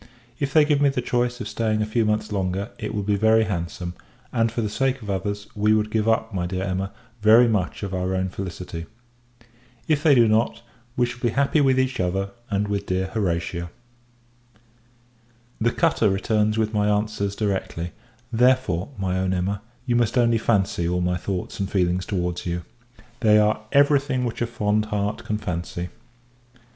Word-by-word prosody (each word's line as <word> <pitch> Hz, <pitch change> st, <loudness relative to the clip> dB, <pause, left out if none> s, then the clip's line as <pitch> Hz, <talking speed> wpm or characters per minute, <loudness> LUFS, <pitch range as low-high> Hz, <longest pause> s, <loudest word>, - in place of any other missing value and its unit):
If 140 Hz, -1 st, -1 dB
they 155 Hz, 0 st, +6 dB
give 145 Hz, -1 st, +2 dB
me 145 Hz, -, +5 dB
the 135 Hz, -, -1 dB
choice 120 Hz, 0 st, 0 dB
of -, -, -4 dB
staying 110 Hz, -2 st, 0 dB
a -, -, 0 dB
few 110 Hz, +1 st, +1 dB
months 105 Hz, 0 st, 0 dB
longer, 95 Hz, +1 st, -1 dB
it 105 Hz, -1 st, -4 dB
will 105 Hz, -, -1 dB
be 105 Hz, +1 st, +1 dB
very 110 Hz, +2 st, +4 dB
handsome; 85 Hz, -3 st, -3 dB, 0.4 s
and, 115 Hz, -1 st, +2 dB
for 115 Hz, -, -2 dB
the 110 Hz, -, 0 dB
sake 135 Hz, +2 st, 0 dB
of 100 Hz, -, -4 dB
others, 100 Hz, +2 st, -3 dB
we 105 Hz, 0 st, +3 dB
would 105 Hz, 0 st, 0 dB
give 110 Hz, 0 st, +1 dB
up, 110 Hz, 0 st, +1 dB
my 90 Hz, -2 st, -1 dB
dear 95 Hz, +1 st, -3 dB
Emma, 95 Hz, +1 st, -2 dB, 0.3 s
very 110 Hz, +3 st, +7 dB
much 105 Hz, -3 st, -1 dB
of 100 Hz, -1 st, -4 dB
our 95 Hz, 0 st, -1 dB
own 95 Hz, 0 st, 0 dB
felicity. 90 Hz, -3 st, -6 dB, 1.0 s
If 150 Hz, -2 st, +2 dB
they 150 Hz, -3 st, +5 dB
do 120 Hz, -2 st, +6 dB
not, 115 Hz, +1 st, +1 dB, 0.3 s
we 125 Hz, -, +4 dB
shall 120 Hz, 0 st, -7 dB
be 120 Hz, -, +1 dB
happy 140 Hz, +5 st, +2 dB
with 130 Hz, -2 st, +3 dB
each 130 Hz, 0 st, 0 dB
other, 95 Hz, +2 st, -1 dB, 0.2 s
and 105 Hz, 0 st, 0 dB
with 100 Hz, 0 st, -2 dB
dear 95 Hz, 0 st, -1 dB
Horatia. 85 Hz, -4 st, -1 dB, 1.9 s
The 115 Hz, +1 st, +2 dB
cutter 110 Hz, -, +2 dB
returns 105 Hz, +2 st, +1 dB
with 110 Hz, 0 st, 0 dB
my 105 Hz, -1 st, +2 dB
answers 105 Hz, -1 st, 0 dB
directly; 95 Hz, -5 st, -2 dB, 0.4 s
therefore, 125 Hz, -7 st, +2 dB
my 95 Hz, -1 st, -1 dB
own 95 Hz, 0 st, 0 dB
Emma, 95 Hz, +3 st, -1 dB, 0.2 s
you 120 Hz, -2 st, +1 dB
must 120 Hz, +1 st, +2 dB
only 115 Hz, -2 st, +4 dB
fancy 95 Hz, -6 st, +1 dB
all 90 Hz, 0 st, 0 dB
my 90 Hz, 0 st, +1 dB
thoughts 95 Hz, +1 st, -4 dB
and 95 Hz, -1 st, -1 dB
feelings 90 Hz, -1 st, 0 dB
towards 90 Hz, -3 st, -2 dB
you. 85 Hz, 0 st, -2 dB, 0.6 s
They 110 Hz, -3 st, +5 dB
are 105 Hz, 0 st, +3 dB
every 140 Hz, 0 st, +5 dB
thing 130 Hz, -2 st, -2 dB
which 120 Hz, -, -4 dB
a 120 Hz, -, +1 dB
fond 105 Hz, -2 st, 0 dB
heart 105 Hz, +1 st, -2 dB
can 105 Hz, -1 st, -1 dB
fancy. 85 Hz, -2 st, -4 dB
105 Hz, 185 wpm, -24 LUFS, 95-115 Hz, 1.9 s, very